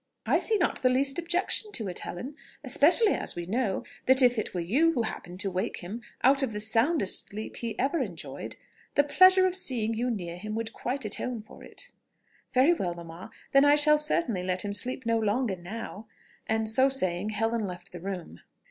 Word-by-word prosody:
"I - - +3
see 445 - +1
not 355 - -1
the 255 - +4
least 270 +3 +2
objection 355 +5 -1
to 220 -5 -1
it, 180 - -4
Helen; 260 +11 -7 0.3
especially 335 - +4
as - - -1
we 175 0 -5
know, 210 0 -1 0.2
that 260 +1 +6
if 245 -2 +4
it - - -4
were 180 - -4
you 275 - +2
who 240 - 0
happened 180 -4 -6
to 195 - 0
wake 185 +5 -3
him 200 +7 -7 0.2
out 270 +2 +5
of 260 -5 -1
the 210 - -3
soundest 225 - +2
sleep 215 +2 -7
he 230 -2 -5
ever 280 +6 0
enjoyed, - - -6 0.4
the 285 - +5
pleasure 370 +5 +6
of 370 - +1
seeing 250 - -1
you 240 +3 -1
near 175 -7 -4
him 215 +3 -6
would 225 0 -4
quite 255 0 -4
atone 220 +2 -3
for 220 - -15
it." - - -10 0.6
"Very 270 +6 +4
well 180 - -3
mamma, 170 +3 -10 0.2
then 275 0 +5
I 290 0 +6
shall 300 0 +6
certainly 300 - 0
let 185 +1 -1
him 200 - -3
sleep 250 +6 -1
no 230 0 +1
longer 220 0 0
now;" 210 +4 -8 0.4
and, 220 0 0
so 260 +5 +3
saying, 185 -6 -1
Helen 225 0 -1
left 180 -1 -9
the 180 - -8
room. 180 - -7
230 Hz, 200 wpm, -28 LUFS, 195-275 Hz, 0.6 s, that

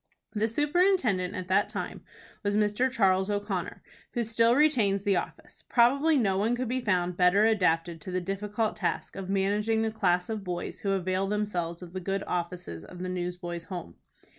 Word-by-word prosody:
The 215 0 +1
superintendent 285 - +2
at 185 -1 -5
that 190 - +3
time - - -5 0.4
was 205 -1 0
Mr. 210 +5 +2
Charles 190 -5 +2
O'Connor, 205 -3 -3 0.3
who 240 - +1
still 230 +1 +3
retains 230 -10 +3
the 200 -1 +2
office. - - -5
Probably 275 +6 +4
no 195 -6 +2
one 225 +4 +1
could 250 0 -2
be 255 +2 -1
found 180 -5 0
better 185 +4 +5
adapted 170 -6 +1
to 185 - -7
the 185 - 0
difficult 210 +4 -2
task 190 -5 -2
of 190 -1 -6
managing 210 +3 +1
the 220 - 0
class 180 -5 +1
of 220 -2 -4
boys 180 -2 -4
who 195 -1 0
avail 185 0 0
themselves 180 -5 -2
of 175 -1 -11
the 185 - -3
good 195 +2 -2
offices 175 - -4
of 180 - -11
the 185 - -3
Newsboys' 175 -1 -4
Home. 175 - -7
195 Hz, 180 wpm, -28 LUFS, 180-225 Hz, 0.4 s, better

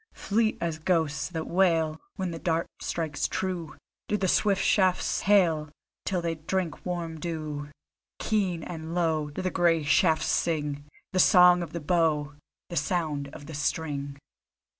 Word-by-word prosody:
Fleet 220 +2 0
as 165 -2 -2
ghosts 160 -3 0
that 160 -3 -4
wail, 165 -4 +2
When 185 -2 -3
the 165 - -6
dart 165 -1 0
strikes 160 -3 -2
true, 180 -4 -3 0.3
Do 210 - +1
the 190 - 0
swift 200 +1 +2
shafts 185 -3 +2
hail, 170 -7 +3 0.4
Till 180 -3 -1
they 165 -1 0
drink 165 +1 -3
warm 170 -3 -4
dew. 150 -3 -4 0.5
Keen 190 -6 0
and 160 0 -6
low 160 -4 +1
Do 145 - -5
the 185 - 0
grey 165 -2 +2
shafts 160 +2 +3
sing 145 -3 -1 0.3
The 185 - +1
Song 180 0 +7
of 170 - -5
the 170 - -4
Bow, 150 -2 +1 0.4
The 170 - -3
sound 150 -2 -1
of 140 +1 -11
the 160 - -9
string. 145 -1 -2
165 Hz, 155 wpm, -27 LUFS, 155-180 Hz, 0.5 s, Song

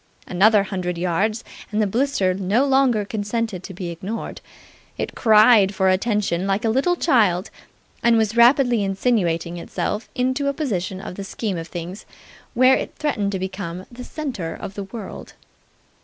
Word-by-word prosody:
Another 200 +3 +4
hundred 185 -3 -3
yards, 195 +6 0 0.3
and 210 - -1
the 215 - +3
blister 220 -3 +1
no 200 +8 +1
longer 265 -6 +3
consented 210 -1 -3
to 190 - -9
be 175 -1 -5
ignored. 190 +7 -6 0.6
It - - -3
cried 215 -3 +5
for 190 0 +2
attention 195 -2 0
like 195 +3 0
a 225 - +2
little 275 +9 +2
child, 210 - +2 0.5
and 235 -1 +4
was 220 0 +1
rapidly 240 -2 +5
insinuating 185 -5 0
itself 210 +5 -4
into 260 +2 0
a 280 - +1
position 190 - -3
in - - -7
the 200 - -6
scheme 200 0 -4
of 165 - -7
things 175 +4 -7 0.5
where 255 +2 +6
it - - -4
threatened 210 -10 -1
to - - 0
become 185 -1 -5
the 245 +1 -9
centre 245 - -5
of 195 - -7
the 200 -1 -6
world. 200 0 -9
205 Hz, 160 wpm, -22 LUFS, 185-235 Hz, 0.6 s, where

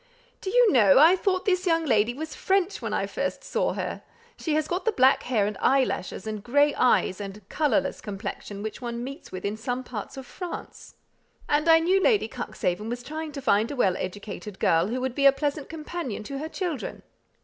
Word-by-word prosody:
"Do 380 - -3
you 485 +1 +5
know, 210 -8 +6
I 320 +6 +8
thought 375 0 0
this 365 -1 +1
young 330 -1 +2
lady 230 -2 +2
was 315 +2 -6
French 390 0 0
when - - -3
I - - 0
first - - -3
saw - - 0
her? - - -4 0.3
she 310 -3 -2
has 310 -1 +1
got 360 +2 -2
the 450 - +2
black 265 -7 +4
hair 225 -5 +1
and 210 0 -2
eyelashes, 260 -8 +1
and 215 -2 -5
grey 285 +4 +3
eyes, 205 -5 +2
and 200 0 -8
colourless 295 -8 0
complexion 200 0 -6
which 220 +4 -6
one 235 -1 -4
meets 275 +5 -8
with 185 +1 -6
in 205 +1 -1
some 245 +3 -3
parts 230 0 -7
of 265 - -7
France, 360 +6 -8 0.5
and 300 +3 +2
I 325 - +9
know 355 +4 +3
Lady 425 0 +3
Cuxhaven 195 +5 -3
was 245 +1 -4
trying 310 +3 -5
to 275 -2 -6
find 220 -2 +3
a 285 - -4
well 190 -8 +2
educated 205 +1 -6
girl 165 0 +3
who 245 +4 -2
would 260 -1 -2
be 280 +2 +4
a - - +9
pleasant 285 +1 -3
companion 310 -8 -5
to 275 +5 -5
her 310 +2 -5
children." 340 -6 -4
265 Hz, 205 wpm, -26 LUFS, 215-320 Hz, 0.5 s, I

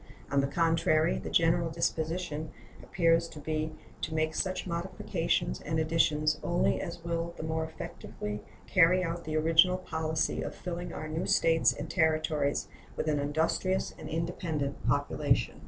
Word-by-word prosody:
On 140 -1 +4
the 135 - 0
contrary, 165 +1 +2
the - - -6
general 165 0 +3
disposition 160 -1 -2 0.3
appears 165 -2 +2
to 155 - -10
be 155 +1 -2 0.3
to 160 - -3
make 155 0 +1
such 185 +2 -1
modifications 170 - -1
and 160 +1 -2
additions 155 -1 +2
only 175 - +1
as 170 -2 -6
will 170 0 -2
the - - -5
more 160 0 -1
effectually 105 -8 -6 0.2
carry 180 0 +5
out 170 0 -3
the 155 0 -1
original 165 +3 +5
policy 160 -3 -1
of - - -5
filling 175 0 -5
our 155 - -5
new 155 +2 -2
States 165 0 +4
and - - -6
Territories 155 -3 +1 0.3
with - - -2
an 150 -1 +2
industrious 160 +6 0
and - - -7
independent 160 -3 -2
population. 145 +3 +1
160 Hz, 150 wpm, -30 LUFS, 155-170 Hz, 0.3 s, carry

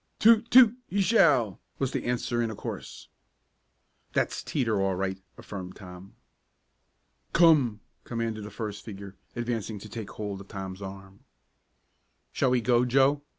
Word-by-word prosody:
"Toot! 230 +1 +5
Toot! 245 -3 +7
He 200 - -1
shall!" 145 - +3 0.2
was 135 -1 -1
the - - -3
answer 120 0 -1
in 115 - 0
a 110 - -6
chorus. - - -7 1.1
"That's - - 0
Teeter 115 -8 0
all 95 -1 +1
right," 95 0 -3 0.2
affirmed 95 -3 -8
Tom. 90 0 -12 1.2
"Come!" 145 -11 +5 0.2
commanded 115 -2 -3
the 105 - -7
first 105 -1 -6
figure, 100 -2 -9 0.2
advancing 115 -3 -3
to 100 - -10
take 110 -2 -6
hold 100 -2 -5
of 100 - -13
Tom's 95 -2 -7
arm. 95 0 -10 1.1
"Shall 130 - +1
we 125 -1 +2
go, 120 +1 +3
Joe?" 135 +3 +3
110 Hz, 145 wpm, -28 LUFS, 100-130 Hz, 1.2 s, Toot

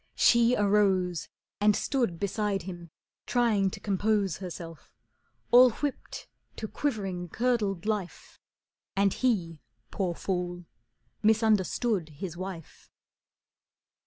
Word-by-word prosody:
She 235 +1 +5
arose 195 -4 +2 0.3
And 210 0 +4
stood 235 - -1
beside 200 -1 -1
him, 175 -2 -8 0.4
trying 225 -6 +2
to - - -8
compose 205 -2 0
Herself, 170 -3 -8 0.6
all 250 +1 +9
whipt 290 +3 -5 0.3
to 220 - -5
quivering, 195 -10 -3
curdled 215 -5 0
life, 210 -5 -4 0.6
And 195 0 +3
he, 180 - -1 0.3
poor 180 -4 -2
fool, 180 -1 -3 0.6
misunderstood 215 -3 +2
his 175 0 -5
wife. 185 -3 -8
200 Hz, 100 wpm, -28 LUFS, 180-220 Hz, 0.6 s, all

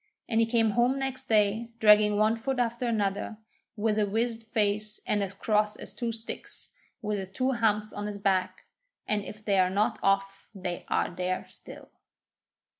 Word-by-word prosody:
And 225 -1 +1
he 230 - +4
came 225 -2 +3
home 245 +4 +2
next 265 -1 -3
day 215 +1 +2
dragging 210 -2 +6
one 215 +2 +3
foot 265 +3 -2
after 240 0 0
another, 210 -1 -1 0.4
with 215 0 +1
a 210 - +2
wizened 225 +2 -1
face 210 -1 0
and 205 - +1
as 195 -2 -1
cross 210 -1 +1
as - - -8
two 235 -1 -2
sticks, 225 0 -7 0.3
with 210 -1 -1
his 190 -1 -6
two 255 +7 0
humps 215 -3 +1
on 205 0 -4
his 205 -1 -5
back, 185 -2 0 0.4
and 210 -1 0
if 215 +1 -10
they 200 -2 +3
are 185 0 +4
not 205 +3 +1
off 195 0 0
they 180 -2 -4
are - - 0
there 180 +1 -2
still. - - -12
210 Hz, 180 wpm, -28 LUFS, 200-230 Hz, 0.4 s, dragging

